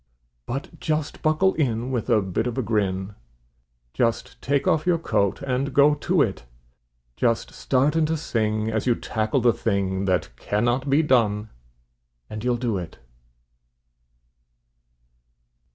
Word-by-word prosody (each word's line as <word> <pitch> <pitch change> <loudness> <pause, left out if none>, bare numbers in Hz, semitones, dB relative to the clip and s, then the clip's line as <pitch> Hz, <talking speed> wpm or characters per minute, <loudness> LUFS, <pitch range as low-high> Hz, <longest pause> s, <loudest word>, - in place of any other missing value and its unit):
But 135 +4 -5
just 155 -1 -2
buckle 155 +5 +3
in 125 -4 -1
with 120 -4 -2
a 105 - +4
bit 95 +5 -1
of 120 - -4
a 130 - 0
grin, 100 -2 -1 0.8
Just 115 -2 -1
take 140 +1 0
off 155 +2 +2
your 175 -2 +4
coat 105 - 0
and 135 +1 -2
go 145 +1 +6
to 145 - +2
it; - - -3 0.7
Just 115 -2 0
start 135 +4 +1
in 160 -1 +3
to 160 +1 0
sing 110 -5 -1
as 110 +2 -1
you 120 - +4
tackle 110 +4 -1
the 120 0 +4
thing 100 -3 -1
That 95 -2 0
"cannot 120 +6 0
be 145 +4 +4
done," 110 -6 +2 0.8
and 105 0 -5
you'll 125 -1 +1
do 115 -5 -1
it. 85 -3 -8
120 Hz, 140 wpm, -24 LUFS, 105-140 Hz, 0.8 s, go